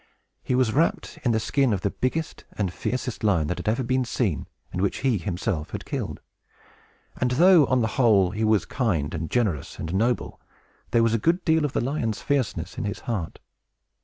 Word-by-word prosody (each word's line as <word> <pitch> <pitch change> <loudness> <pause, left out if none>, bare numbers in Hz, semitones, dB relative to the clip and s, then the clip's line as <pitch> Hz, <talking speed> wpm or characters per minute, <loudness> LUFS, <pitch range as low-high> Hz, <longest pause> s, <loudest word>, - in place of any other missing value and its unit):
He 125 - -1
was 125 -4 +2
wrapt 160 +1 0
in 125 - +2
the 110 - +2
skin 135 0 +1
of 95 - -1
the 100 - 0
biggest 160 +5 -3
and 95 -4 -2
fiercest 125 -2 -3
lion 90 -8 +3
that 90 - -4
ever 110 +2 +2
had - - -3
been 130 +1 +1
seen, 115 - -1 0.3
and 90 - -2
which 100 - 0
he 120 -7 +2
himself 85 -3 -2
had - - -6
killed; - - -4 1.0
and 125 - +1
though, 165 +4 +6
on 130 -1 +2
the 110 - +2
whole, 100 -6 +5
he 105 +2 -2
was 110 -3 +3
kind, 85 - -1
and 80 -1 -3
generous, 105 - -1
and 80 - -5
noble, 115 +5 0 0.5
there 115 -1 +3
was 115 -1 +2
a 115 - +2
good 170 - +1
deal 160 -2 +3
of 145 - -3
the - - +1
lion's 120 -4 -1
fierceness 140 -5 -2
in - - -2
his 100 +1 -4
heart. 100 -9 -3
115 Hz, 200 wpm, -25 LUFS, 100-130 Hz, 1.0 s, though